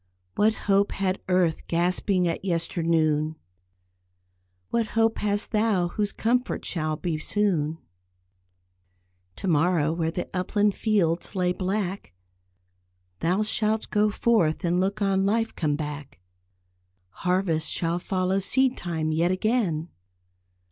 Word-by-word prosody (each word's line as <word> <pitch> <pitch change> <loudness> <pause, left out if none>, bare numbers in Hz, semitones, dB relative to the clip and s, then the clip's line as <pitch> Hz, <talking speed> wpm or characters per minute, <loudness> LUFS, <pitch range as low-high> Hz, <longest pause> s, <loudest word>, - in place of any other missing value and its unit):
"What 215 +1 +3
hope 200 0 +3
had 190 -1 -1
earth 180 -3 +1
gasping 180 +2 +1
at 165 - -2
yesternoon? 165 -3 0 1.4
What 230 -2 +1
hope 225 0 +3
hast 205 0 -1
thou 210 -5 +2
whose 205 +2 -1
comfort 245 +3 -1
shall 155 -3 -1
be 160 -1 -3
soon. 165 -5 0 1.6
To - - -5
morrow 160 -1 +2
where 165 -1 -1
the 175 +2 -4
upland 205 +3 +1
fields 190 -5 0
lay 180 -1 +1
black, 190 - -3 1.0
Thou 185 +5 +1
shalt 215 0 -1
go 210 0 +3
forth 200 -7 +1
and 175 +1 +2
look 200 +3 0
on 195 -1 +2
life 225 +3 +1
come 150 -3 0
back. 145 - -6 0.9
Harvest 170 - 0
shall 170 +1 0
follow 185 0 0
seed 260 +6 +2
time 160 -3 -2
yet 165 +3 +2
again. 185 -5 0
185 Hz, 120 wpm, -26 LUFS, 165-205 Hz, 1.6 s, What